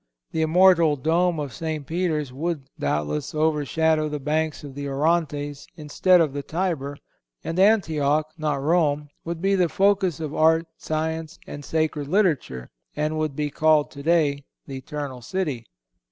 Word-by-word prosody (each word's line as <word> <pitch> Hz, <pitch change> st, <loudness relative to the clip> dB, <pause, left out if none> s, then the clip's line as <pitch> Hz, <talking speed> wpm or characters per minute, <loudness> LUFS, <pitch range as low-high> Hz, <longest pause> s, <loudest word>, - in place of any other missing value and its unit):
The 160 Hz, -, -1 dB
immortal 170 Hz, -1 st, +5 dB
Dome 165 Hz, +4 st, +1 dB
of 140 Hz, -5 st, -4 dB
St. 155 Hz, +1 st, -4 dB
Peter's 155 Hz, -4 st, -1 dB
would, 155 Hz, +1 st, -3 dB, 0.2 s
doubtless, 75 Hz, -, -2 dB
overshadow 155 Hz, 0 st, +1 dB
the 150 Hz, 0 st, -4 dB
banks 155 Hz, +2 st, -1 dB
of 140 Hz, -2 st, -8 dB
the 140 Hz, +1 st, -5 dB
Orontes 145 Hz, 0 st, -1 dB
instead 175 Hz, +4 st, +3 dB
of 155 Hz, -5 st, +1 dB
the 145 Hz, -, -3 dB
Tiber; 155 Hz, -4 st, -3 dB, 0.5 s
and 165 Hz, +2 st, -3 dB
Antioch, 155 Hz, -8 st, +3 dB
not 150 Hz, -3 st, -2 dB
Rome, 150 Hz, -2 st, +1 dB
would 170 Hz, +1 st, -5 dB
be 195 Hz, 0 st, +3 dB
the 180 Hz, -3 st, +2 dB
focus 195 Hz, -2 st, +2 dB
of 155 Hz, -2 st, -4 dB
art, 160 Hz, +1 st, +3 dB
science, 160 Hz, +1 st, -3 dB
and 145 Hz, -, -8 dB
sacred 155 Hz, -2 st, -1 dB
literature, 150 Hz, -, 0 dB, 0.2 s
and 155 Hz, +1 st, -1 dB
would 155 Hz, -3 st, -2 dB
be 150 Hz, 0 st, -2 dB
called 155 Hz, 0 st, +3 dB
today 145 Hz, -1 st, +1 dB, 0.2 s
"The 135 Hz, -2 st, -7 dB
Eternal 140 Hz, -2 st, -6 dB
City." 140 Hz, -, -3 dB
155 Hz, 150 wpm, -24 LUFS, 145-165 Hz, 0.5 s, immortal